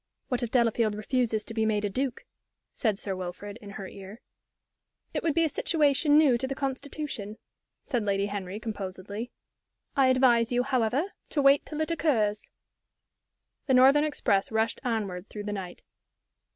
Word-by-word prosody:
"What 250 -1 -1
if 240 - -2
Delafield 230 -3 +2
refuses 220 0 0
to 225 - -7
be 220 -1 0
made 210 -1 +1
a - - +2
duke?" 260 +2 -2 0.5
said 215 -5 0
Sir 195 -1 -4
Wilfrid, 185 +4 -6
in 205 - -10
her 195 -1 -7
ear. 195 +4 -10 0.9
"It - - -1
would 320 -3 0
be 330 - +4
a - - +3
situation 295 -1 +2
new 275 -6 +5
to 265 - -2
the 270 - -3
Constitution," 270 -5 -4 0.5
said 245 -6 -1
Lady 200 -1 +1
Henry, 200 -1 -4
composedly. 205 +1 -5 0.7
"I 270 -2 +5
advise 255 -3 +4
you, 245 0 +2
however, 265 - 0 0.2
to 290 - 0
wait 275 +1 +5
till 305 0 -4
it 315 - -1
occurs." 225 -11 +1 1.2
The 265 - +4
northern 270 +4 +6
express 205 -10 0
rushed 220 0 0
onward 210 -6 -2
through 210 - -6
the 205 0 -3
night. 185 -3 -7
230 Hz, 165 wpm, -28 LUFS, 205-270 Hz, 1.2 s, northern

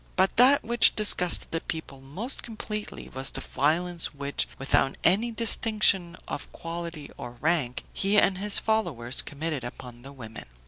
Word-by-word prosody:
But 190 +1 +1
that 260 +4 +6
which 235 0 +4
disgusted 180 -4 +3
the 165 - -2
people 140 -4 -7
most 185 - -7
completely 215 -2 -6
was 130 0 -4
the - - -4
violence 165 +3 -1
which, 140 0 -3
without 135 0 +1
any 205 +7 +3
distinction 215 -5 +2
of 145 - -6
quality 165 -3 -7
or 120 - -8
rank, 135 -1 -1
he 200 +2 +1
and 195 -2 +3
his 205 +1 +2
followers 160 - 0
committed 150 -2 -5
upon 120 0 -10
the 135 +2 -12
women. 115 - -10
170 Hz, 150 wpm, -26 LUFS, 135-210 Hz, -, that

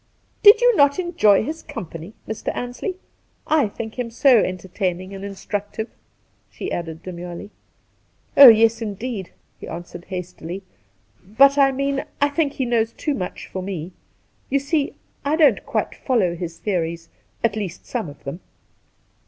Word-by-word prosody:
' - - -41
Did 415 +3 +8
you - - +5
not 285 -4 +4
enjoy 340 - +3
his 315 +6 -5
company, 165 +4 -8
Mr. 220 - -3
Ansley? 245 +10 -4 0.5
I 300 -6 +3
think 220 +3 -7
him 240 -2 -2
so 245 +1 +5
entertaining 185 0 -2
and 195 0 -7
instructive,' 205 +2 -5 0.6
she 100 - -6
added 165 -1 -5
demurely. 175 +2 -7 0.4
' - - -40
Oh 275 - +11
yes, 225 0 +6
indeed 210 -2 -4 0.2
!' - - -42
he - - -8
answered 175 +1 -8
hastily; 180 0 -6 0.4
' - - -37
but 275 +1 +7
I 275 -1 +6
mean, 275 +1 -1 0.2
I 285 - +3
think 290 -1 0
he 260 - -2
knows 230 -1 +1
too 300 - -2
much 185 -9 -5
for 185 - -6
me. 185 -2 -5 0.6
You 275 - +2
see, 280 +1 -1 0.3
I 290 +2 +1
don't 290 -10 +4
quite - - -1
follow 205 -10 0
his 170 -1 -6
theories 170 -3 -2 0.2
— - - -38
at 225 -3 +2
least, 195 -5 -5
some 230 -10 -3
of 145 - -14
them.' 140 +6 -6
215 Hz, 165 wpm, -22 LUFS, 180-275 Hz, 0.6 s, Oh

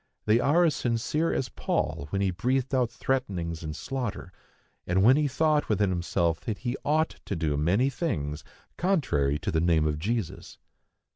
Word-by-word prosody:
They 110 +2 +4
are 150 +7 +4
as 160 -4 +3
sincere 125 +7 0
as 130 - -1
Paul 70 - -2
when 100 +4 -1
he 95 - +1
breathed 125 +8 -1
out 125 -3 +2
threatenings 95 -11 -2
and 75 -2 -5
slaughter, 120 - -4 0.5
and 95 +2 +2
when 125 +5 +7
he 150 0 +2
thought 150 +2 +1
within 105 -2 +2
himself 85 -2 0
that 110 -3 -4
he 125 0 -3
ought 155 +2 +1
to 100 - -3
do 80 -3 0
many 95 - +2
things 75 - -3 0.3
contrary 85 - +1
to - - -3
the 80 - +1
name 80 -2 +3
of 75 0 -1
Jesus. 110 +1 -3
105 Hz, 170 wpm, -27 LUFS, 85-135 Hz, 0.5 s, when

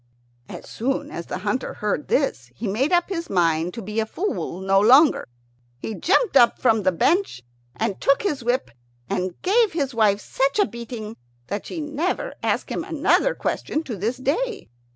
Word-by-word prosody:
As - - -9
soon 270 +5 -2
as 170 - -6
the - - -4
hunter 205 +7 -2
heard 210 +8 -2
this 125 - 0
he 225 - -4
made 250 - 0
up 350 0 +2
his 335 -3 -4
mind 165 -2 +1
to 230 - -6
be 210 +3 -3
a 220 - 0
fool 360 - -3
no 195 +1 +3
longer. 260 +9 +5 0.5
He 220 - -5
jumped 380 - +1
up 240 -3 +6
from 225 -4 +3
the 185 -1 +2
bench, 305 - +1 0.3
and 195 - -2
took 275 +7 +3
his 295 -11 -1
whip 245 - 0 0.4
and 180 -1 -2
gave 425 +1 +3
his 280 -5 -1
wife 210 -3 +3
such 270 - -1
a 410 - +4
beating 235 - -7 0.3
that 205 +1 -4
she 335 - -5
never 315 - -2
asked - - -1
him - - -2
another - - +2
question 310 - -2
to 245 -7 -5
this 220 +6 -2
day. 400 - -2
245 Hz, 180 wpm, -23 LUFS, 205-315 Hz, 0.5 s, up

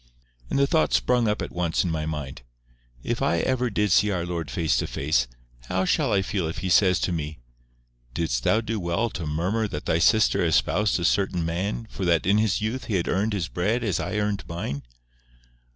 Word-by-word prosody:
And - - 0
the 140 - +4
thought 155 +2 +1
sprung 125 -2 +2
up 105 - 0
at - - -6
once 85 -2 0
in 90 - -1
my 80 -1 -2
mind—"If - - -7
I 85 - +2
ever 125 -1 0 0.2
see 105 +2 +4
our 90 -4 -1
Lord 85 -4 -4
face 80 +6 0
to - - -1
face, 70 -3 0 0.4
how 95 +5 0
shall - - +1
I 95 -1 +2
feel 95 -3 -2
if 80 - -5
He - - 0
says 90 0 +4
to - - 0
me; 80 -2 -3 0.8
'Didst 65 -7 -1
thou 110 - +3
do 110 -1 -3
well 95 +6 -1
to 85 -5 -5
murmur 90 +9 0
that 75 -7 -6
thy 80 - +1
sister 110 +3 +4
espoused 90 +5 +2
a 85 - -1
certain 95 -3 +1
man 95 +7 -2
for 95 - -5
that 85 -2 +2
in 100 +3 +4
his 110 -3 +1
youth 115 +5 -3
he 105 - -2
had 85 - 0
earned 105 +4 0
his 90 -5 -1
bread 105 +9 -1
as 100 -7 0
I 105 - -3
earned 105 -1 -1
mine? 85 -4 -4
90 Hz, 205 wpm, -25 LUFS, 80-105 Hz, 0.8 s, the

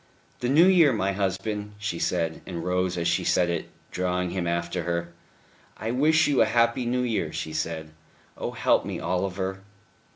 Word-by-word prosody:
"The 125 - -1
New 155 +6 +6
Year, 175 -6 +6
my 100 -3 0
husband," 105 +2 -2
she 105 -5 -3
said, 80 -2 -1
and 85 -2 -5
rose 90 0 0
as 85 0 0
she 85 - +1
said 90 -1 +2
it, 85 - -3 0.2
drawing 90 -1 -1
him 90 -1 -2
after 85 +1 -1
her. 85 0 -3 0.6
"I 110 +2 -3
wish 155 +5 +4
you 145 -2 +3
a - - +6
happy 115 +2 +2
New 125 +1 +1
Year," 110 -10 -1
she 80 - -5
said. 80 0 -3 0.4
"Oh - - -4
help - - +2
me, - - -4
Oliver." 95 +2 -2
95 Hz, 175 wpm, -26 LUFS, 85-115 Hz, 0.6 s, New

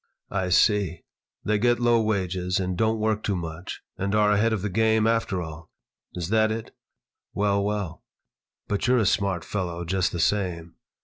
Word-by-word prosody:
"I 95 -1 -1
see. 95 -2 +3 0.4
They 105 0 +1
get 120 +2 +3
low 120 -1 +3
wages 95 -4 -1
and 90 -1 -2
don't 110 +4 +1
work 110 -1 0
too 100 - -1
much 85 0 -6 0.2
and 100 +2 0
are 105 -1 +4
ahead 105 +3 +3
of 105 -4 -1
the 105 - -1
game, 110 +2 +2
after 115 -5 +1
all. 80 0 -9 0.5
Is 85 -1 -4
that 110 0 +3
it? 110 0 -5 0.6
Well, 100 -1 +1
well. 100 -5 -3 0.6
But 105 +3 -1
you're 125 +1 +4
a 110 - +2
smart 95 -3 0
fellow, 85 -3 -3
just 95 +2 0
the 85 - -4
same." 85 -3 0
100 Hz, 175 wpm, -25 LUFS, 90-110 Hz, 0.6 s, are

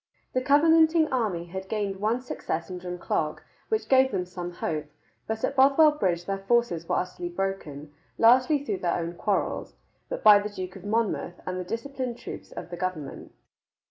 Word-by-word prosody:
The 255 - +1
Covenanting 320 +3 +5
army 205 -9 0
had 190 +2 -7
gained 205 -3 -2
one 220 +5 0
success 165 -8 -4
in 180 - -5
Drumclog, 175 -3 -2 0.3
which 440 -1 0
gave 265 0 +5
them 180 -7 -2
some 175 -1 -6
hope, 155 -3 -3 0.4
but 220 0 -3
at 275 - 0
Bothwell 280 +3 +6
Bridge 180 - -1
their 195 +1 -2
forces 195 -5 0
were - - +2
utterly 180 -1 -3
broken, 170 -6 -4 0.2
largely 260 +5 +5
through 205 -7 -2
their 175 -1 0
own 170 0 -3
quarrels, 200 +3 -2 0.5
by 210 -1 +9
the 205 +1 -4
Duke 185 -3 -7
of - - -11
Monmouth 210 -4 -1
and 185 0 -3
the - - -3
disciplined 245 +4 -4
troops - - -9
of - - -8
the 175 - -5
government. 175 -6 -5
195 Hz, 175 wpm, -27 LUFS, 175-255 Hz, 0.5 s, by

